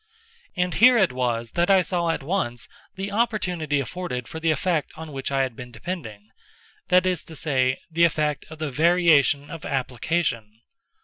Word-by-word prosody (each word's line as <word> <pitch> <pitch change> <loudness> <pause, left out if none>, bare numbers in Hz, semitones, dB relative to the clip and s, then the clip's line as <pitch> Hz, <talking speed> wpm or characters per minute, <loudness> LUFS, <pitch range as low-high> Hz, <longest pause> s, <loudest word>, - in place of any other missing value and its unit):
And 180 -1 0
here 250 +2 +6
it 190 -5 +3
was 120 -2 -2
that 175 +2 +1
I 190 -2 +5
saw 170 0 -1
at 165 - -1
once 135 - -2 0.3
the 195 +1 -4
opportunity 180 -9 0
afforded 130 -2 -4
for 160 - -7
the 165 0 0
effect 155 +1 0
on 160 -1 -8
which 135 -1 -4
I 135 -1 +2
had 130 -3 -4
been 125 +1 -9
depending—that 125 - -4
is 180 -3 0
to 160 - -11
say, 130 -4 +1
the 165 +1 +2
effect 150 -3 0
of 155 - -10
the 155 -2 -3
variation 155 -2 +3
of 165 -3 -8
application. 125 -4 -2
155 Hz, 170 wpm, -24 LUFS, 130-180 Hz, 0.3 s, here